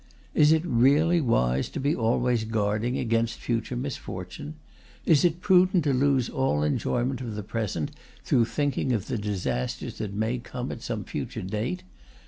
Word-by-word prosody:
Is 150 0 +5
it 160 0 +3
really 150 +6 +4
wise 65 - +1
to - - -5
be 145 +4 +1
always 120 0 +1
guarding 110 +2 0
against 115 0 0
future 115 +1 -2
misfortune? 120 - -6 0.5
Is 155 -4 +5
it 175 0 +2
prudent 185 -2 +4
to 145 -2 +2
lose 130 -1 +2
all 130 - 0
enjoyment 125 - 0
of 115 -4 -5
the 105 - -4
present 100 -7 -3 0.3
through 120 - +3
thinking 140 0 0
of 110 -4 -1
the 120 - -2
disasters 95 -11 -3
that 100 -2 -4
may 110 +4 0
come 125 +1 -5
at - - -7
some - - -3
future - - -5
date? 110 - -3
120 Hz, 160 wpm, -26 LUFS, 105-140 Hz, 0.5 s, Is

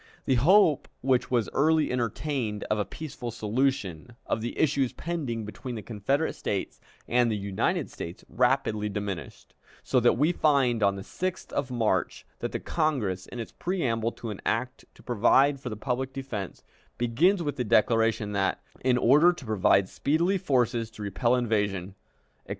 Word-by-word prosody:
The - - +2
hope 170 -1 +5
which 130 -1 +1
was 120 -3 +1
early 155 +2 +3
entertained 120 -2 -2
of 110 - +2
a 105 - 0
peaceful 135 -6 -7
solution 115 - -2
of 110 - -1
the 120 - -4
issues 135 -4 +1
pending 140 -10 -3
between 120 +4 -7
the 110 - -6
Confederate 130 +8 -1
States 100 -2 -4 0.3
and 120 -1 +3
the 110 - 0
United 100 -1 -1
States 85 +1 -8
rapidly 125 -4 +1
diminished, 100 -4 -6 0.3
so 130 - +2
that 120 0 +4
we 150 +6 +3
find 135 -8 +2
on 100 -1 +3
the 95 - -7
6th 185 - -4
of 140 -2 -1
March 110 -8 -1
that - - -3
the - - -3
Congress, 125 - -1
in 125 - -8
its 115 - -6
preamble 120 - -1
to 115 - -6
an 100 - -8
act 125 +3 -2
to - - -18
provide 135 +4 +3
for 130 - -6
the 105 - -6
public 130 +3 -2
defense, 130 -9 -6 0.3
begins 170 - +2
with 145 -2 -3
the 125 - 0
declaration 115 -1 +2
that, 95 -1 0 0.2
"in 125 -1 +3
order 145 +9 +6
to 175 -7 -9
provide 100 -3 +3
speedily 170 - +1
forces 120 -6 +1
to 110 -1 -9
repel 115 +5 +1
invasion," 105 -6 -1 0.5
etc. - - -22
120 Hz, 165 wpm, -27 LUFS, 105-140 Hz, 0.5 s, order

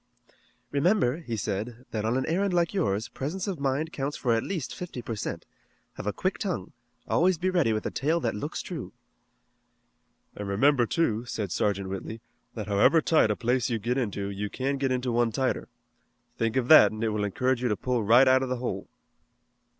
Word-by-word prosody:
"Remember," 145 - +2
he 125 -10 -5
said, 110 +5 -4
"that 110 -1 -2
on 115 +3 +1
an 130 - 0
errand 185 +3 0
like 170 0 +1
yours, 110 - 0
presence 150 +11 -4
of 190 -6 -3
mind 140 +4 -1
counts 140 +1 -3
for 120 -3 +1
at 115 - +2
least 170 -5 -4
fifty 175 -8 -7
per 115 -1 -5
cent. 100 - -5 0.5
Have - - -7
a - - +2
quick - - -2
tongue. - - -3 0.4
Always 180 +1 +3
be 185 +3 0
ready 175 -10 +2
with 110 -1 -2
a - - -2
tale 155 +5 0
that 115 - 0
looks 105 - -4
true." - - -6 1.4
"An' 105 - -5
remember, 120 +5 +3
too," 120 -8 0
said 105 -6 -4
Sergeant 100 -1 0
Whitley, 95 +4 -5 0.4
"that 110 -3 -4
however 105 +11 +4
tight 155 -7 +3
a 105 - +1
place 125 +2 0
you 115 - 0
get 120 +5 -1
into 100 -4 -2
you 100 +1 -4
can 135 +4 -2
get 135 -1 0
into 125 -1 0
one 120 0 +2
tighter. 130 +4 -1 0.7
Think 115 -1 -1
of 130 -2 +1
that 155 - +8
and 110 +1 -5
it 115 - +2
will 105 -1 -1
encourage 125 +5 0
you 125 - +1
to 105 - 0
pull 125 -2 -1
right 120 +6 +6
out 130 0 +5
of 130 - -2
the 130 - 0
hole." 125 0 -4
125 Hz, 205 wpm, -27 LUFS, 110-145 Hz, 1.4 s, that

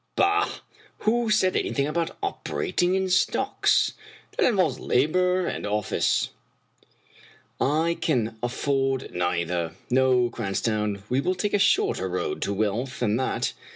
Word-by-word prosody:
Bah! 415 +1 +3 0.5
who 230 +1 +1
said 200 -4 +3
anything 140 - 0
about 165 +2 -2
operating 185 - -1
in 190 0 0
stocks? 180 -1 +2 0.4
That 465 - +3
involves 180 - +1
labor 180 +7 +2
and - - -3
an 105 - -3
office. 105 -1 +1 1.3
I 160 +4 +1
can 115 -7 0
afford 135 +1 -1
neither. 85 -1 -1 0.2
No, 125 -1 +3
Cranstoun, 105 -2 -2
we 125 +3 +1
will 185 +5 0
take 200 +3 -2
a 205 - +3
shorter 415 - +2
road 390 -3 -3
to - - -1
wealth 110 +6 -2
than 110 -2 +2
that. 130 - -1
135 Hz, 130 wpm, -25 LUFS, 115-185 Hz, 1.3 s, Bah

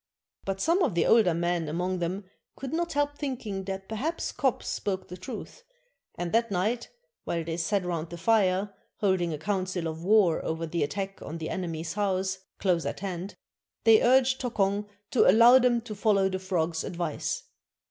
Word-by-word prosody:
But 195 0 -2
some 335 - +2
of 210 - +1
the 170 - +3
older 205 -8 +5
men 170 -1 0
among 180 +3 -1
them 180 +4 -2 0.3
could 270 +1 -6
not 340 +1 -1
help 290 0 0
thinking 225 -9 -4
that 190 0 -5
perhaps 285 +10 -2
Kop 255 0 0
spoke 190 -2 -3
the 180 - -6
truth, 185 - -8 0.5
and 175 -1 -3
that 230 +1 +2
night, 210 +6 -1 0.3
while 170 -1 -2
they 165 0 -3
sat 180 +3 0
round 170 -2 -3
the 170 - -7
fire, 195 0 +2 0.2
holding 190 -4 +1
a 155 - -3
council 185 0 -2
of 160 +1 -5
war 195 -4 +4
over 160 +1 -2
the 170 +1 -2
attack 195 +6 -3
on 160 - -6
the 160 -1 -4
enemy's 165 -2 -3
house, 190 -2 0 0.2
close 175 -4 +1
at - - -5
hand, 190 0 -5 0.5
they 225 -1 +7
urged 260 +1 +4
Tokong 205 -4 0 0.2
to 250 - +5
allow 235 +6 +8
them 240 -2 +3
to 225 -2 -7
follow 200 -2 +2
the 190 0 -3
frog's 170 -4 -1
advice. 170 -3 -3
190 Hz, 180 wpm, -28 LUFS, 175-225 Hz, 0.5 s, allow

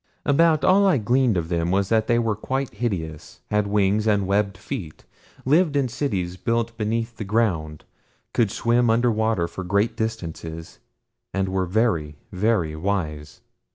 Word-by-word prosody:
About 155 +2 +3
all 195 +2 +5
I 185 - +4
gleaned 120 -1 +2
of 80 -1 -2
them 85 -1 0
was 95 +1 +1
that 110 -1 +2
they 120 - +3
were 115 -3 +1
quite 130 +5 -3
hideous, 90 -9 -4
had 105 -1 +1
wings, 105 +1 +1
and 100 -2 +2
webbed 100 0 0
feet; 95 - -7 0.4
lived 155 +3 +3
in 140 -2 +2
cities 95 -9 -2
built 115 +2 -1
beneath 115 +1 -2
the - - -4
ground; 95 -8 -1 0.5
could 115 -4 +2
swim 120 +3 +1
under 120 +2 +3
water 110 -5 0
for 95 - -7
great 100 +5 +1
distances, 85 -7 -5 0.6
and 95 -1 0
were 95 -1 -1
very, 85 -7 0 0.2
very 95 -5 0
wise. 80 -4 -3
105 Hz, 155 wpm, -23 LUFS, 90-115 Hz, 0.6 s, all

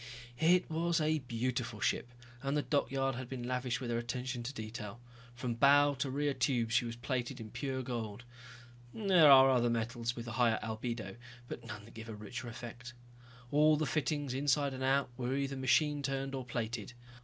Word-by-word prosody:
It 175 +3 +4
was 165 +1 +1
a 155 0 +2
beautiful 120 -2 -3
ship, 125 - 0 0.3
and 135 +2 0
the 145 - +1
dockyard 135 -2 0
had 125 0 -6
been 130 -2 -5
lavish 125 +1 -1
with 125 -3 -4
their 115 - +1
attention 125 +1 -3
to 120 +3 -4
detail. 110 -2 -7 0.4
From 120 -1 -2
bow 145 +4 +5
to 140 0 0
rear 145 +2 0
tubes 120 -5 0
she 115 +1 +3
was 115 0 -4
plated 120 +1 -3
in 110 -2 -8
pure 130 -2 -3
gold. 120 -3 -4 0.7
There 185 -8 +6
are 135 -1 +9
other 120 -2 +3
metals 115 +1 -1
with 120 -1 -6
a - - -4
higher 120 -2 +3
albedo, 110 -2 -4 0.3
but - - -7
none 105 0 -7
that 115 - -15
give 110 0 -9
a 110 - -5
richer 115 +4 -7
effect. 120 0 -8 0.6
All 150 +1 +5
the 155 - 0
fittings, 145 0 -1
inside 140 +1 +1
and 130 - -6
out, 135 -1 +2
were 130 +1 -1
either 140 0 -1
machine 145 +3 +2
turned 135 0 -2
or 130 -2 -4
plated. 115 -2 -4
125 Hz, 190 wpm, -33 LUFS, 120-140 Hz, 0.7 s, are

